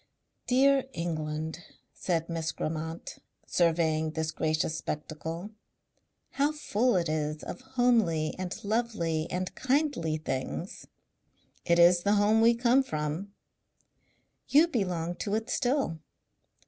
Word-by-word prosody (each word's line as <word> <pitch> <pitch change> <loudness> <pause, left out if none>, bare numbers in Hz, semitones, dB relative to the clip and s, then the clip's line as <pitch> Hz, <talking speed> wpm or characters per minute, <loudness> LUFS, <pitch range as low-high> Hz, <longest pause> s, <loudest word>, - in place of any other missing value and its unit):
"Dear 270 +1 +4
England!" 160 -1 -3 0.3
said 165 -3 -1
Miss 165 -1 -2
Grammont, 160 +1 -5 0.3
surveying 160 -2 +2
this 160 0 -2
gracious 155 0 0
spectacle. 160 +5 -5 0.8
"How 285 +2 +1
full 250 -6 +1
it 175 -2 +1
is 155 0 -2
of - - -7
homely 235 -12 +2
and 185 -1 -5
lovely 205 -8 -1
and 180 0 -3
kindly 260 - 0
things!" 145 +4 -4 0.8
"It 170 -1 +3
is 175 +1 +6
the 205 +3 +2
home 210 +2 +4
we 230 +1 +5
come 245 +3 +4
from." 155 - -4 1.1
"You 305 +4 +6
belong 180 - -2
to 205 0 -2
it 220 +1 -3
still." 255 - 0
175 Hz, 115 wpm, -29 LUFS, 160-235 Hz, 1.1 s, is